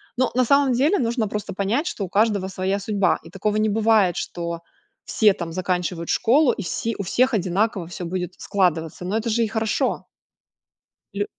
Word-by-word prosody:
Но 255 Hz, -1 st, +1 dB
на 255 Hz, 0 st, +2 dB
самом 280 Hz, +1 st, +4 dB
деле, 285 Hz, +11 st, +2 dB
нужно 230 Hz, -2 st, 0 dB
просто 205 Hz, -1 st, -5 dB
понять, 220 Hz, -, -1 dB
что 200 Hz, -, -3 dB
у -, -, -10 dB
каждого 205 Hz, -2 st, +1 dB
своя 190 Hz, +1 st, -2 dB
судьба, 200 Hz, -2 st, +1 dB
и 165 Hz, -, -12 dB
такого 210 Hz, +3 st, -1 dB
не 215 Hz, 0 st, +2 dB
бывает, 215 Hz, -4 st, +3 dB
что 170 Hz, -1 st, -4 dB, 0.4 s
все 210 Hz, -3 st, +3 dB
там 170 Hz, -4 st, -6 dB
заканчивают 180 Hz, -2 st, -2 dB
школу, 270 Hz, +4 st, +4 dB
и 205 Hz, -, -5 dB
все 225 Hz, +5 st, -3 dB
у 200 Hz, -, -3 dB
всех 255 Hz, +6 st, +2 dB
одинаково 190 Hz, 0 st, 0 dB
всё 175 Hz, +1 st, -7 dB
будет 180 Hz, +1 st, -4 dB
складываться. 180 Hz, -4 st, 0 dB
Но 195 Hz, -, -2 dB
это 230 Hz, +1 st, -2 dB
же 230 Hz, +1 st, +2 dB
и -, -, 0 dB
хорошо. 220 Hz, 0 st, -1 dB, 1.1 s
Лю -, -, -1 dB
205 Hz, 185 wpm, -23 LUFS, 180-230 Hz, 1.1 s, самом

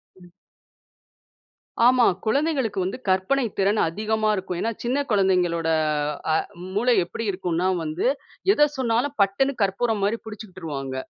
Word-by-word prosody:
ம். 180 Hz, -1 st, -17 dB, 1.6 s
ஆமா. 250 Hz, -1 st, +5 dB, 0.2 s
குழந்தைகளுக்கு 270 Hz, -4 st, 0 dB
வந்து 190 Hz, +6 st, -3 dB
கற்பனை 190 Hz, +9 st, +2 dB
திறன் 200 Hz, +2 st, +2 dB
அதிகமா 215 Hz, +4 st, -1 dB
இருக்கும். 185 Hz, -2 st, -4 dB
ஏன்னா, 230 Hz, -, 0 dB
சின்ன 260 Hz, +4 st, 0 dB
குழந்தைங்களோட 180 Hz, -5 st, +2 dB, 0.7 s
அ -, -, +3 dB, 0.4 s
மூளை 240 Hz, +3 st, +3 dB
எப்படி 230 Hz, -, -5 dB
இருக்குன்னா 180 Hz, -1 st, -1 dB, 0.2 s
வந்து, 155 Hz, +7 st, -1 dB, 0.5 s
எத 295 Hz, -4 st, +4 dB
சொன்னாலும் 255 Hz, +3 st, 0 dB
பட்டுன்னு 230 Hz, +8 st, +2 dB
கற்பூரம் 205 Hz, +2 st, 0 dB
மாரி 225 Hz, +3 st, 0 dB
பிடிச்சுக்கிட்டுருவாங்க. 170 Hz, -11 st, -6 dB
205 Hz, 120 wpm, -24 LUFS, 185-240 Hz, 1.6 s, ஆமா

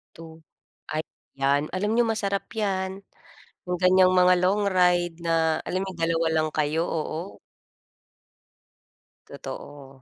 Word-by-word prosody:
Tu 165 Hz, -, -10 dB, 0.6 s
ay, 155 Hz, +1 st, -2 dB, 0.3 s
yan 140 Hz, +2 st, +1 dB
alam 205 Hz, +3 st, 0 dB
niyo 240 Hz, +1 st, +4 dB
masarap 200 Hz, -3 st, -2 dB
yan, 190 Hz, -2 st, -2 dB, 0.7 s
yung 180 Hz, -, 0 dB
ganiyang 185 Hz, 0 st, +5 dB
mga 180 Hz, 0 st, +6 dB
long 200 Hz, +3 st, +2 dB
ride, 180 Hz, -2 st, +2 dB
na 165 Hz, -1 st, +1 dB
alam 185 Hz, +1 st, -1 dB
niyong 185 Hz, -3 st, -8 dB
2 165 Hz, 0 st, +1 dB
lang 155 Hz, -1 st, +1 dB
kayo, 155 Hz, +1 st, 0 dB
oo. 165 Hz, +3 st, -4 dB, 1.9 s
Totoo. 135 Hz, -2 st, -10 dB
175 Hz, 120 wpm, -25 LUFS, 160-190 Hz, 1.9 s, mga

